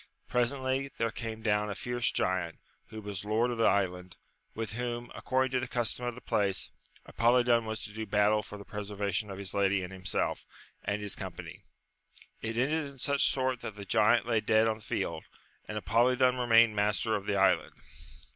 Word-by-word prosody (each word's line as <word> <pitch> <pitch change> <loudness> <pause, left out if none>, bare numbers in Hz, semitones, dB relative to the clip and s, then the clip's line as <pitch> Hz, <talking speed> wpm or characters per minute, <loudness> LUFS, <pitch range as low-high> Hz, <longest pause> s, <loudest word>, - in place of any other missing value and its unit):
Presently 130 +2 0
there 115 -1 0
came 110 -1 -6
down 105 -1 +1
a 100 - -3
fierce 120 +4 -1
giant, 90 -3 -1 0.3
who 110 -1 -8
was 100 -2 -5
lord 110 +4 +1
of 120 - -4
the 115 - +5
island, 90 -2 0 0.4
with 110 -1 -4
whom, 120 0 -4
according 130 0 0
to 130 - +1
the 130 - -3
custom 120 0 0
of 120 - -3
the 125 - -10
place, 100 -4 0 0.3
Apolidon 120 0 +3
was 110 0 -4
to 105 - -7
do 110 0 -5
battle 105 +1 +3
for 105 - -10
the 100 - -11
pre 105 - -5
servation 100 0 -2
of 95 - -6
his 100 -1 -3
lady 100 -1 +2
and 90 +1 -7
himself, 95 0 -2 0.4
and 105 0 -2
his 100 - -2
company. - - -8 0.8
It 115 0 -3
ended 150 +6 +1
in 140 -1 -12
such 140 +2 +2
sort 130 -2 0
that 110 - -6
the 100 -1 -8
giant 110 +4 +4
lay 115 -2 +1
dead 110 +1 +3
on 110 -1 0
the - - -16
field, - - -3 0.4
and 105 - -4
Apolidon 125 +4 +3
remained 115 -3 +5
master 105 +2 +1
of 100 -1 -4
the 100 - +1
island. 95 0 +3
110 Hz, 195 wpm, -30 LUFS, 100-120 Hz, 0.8 s, the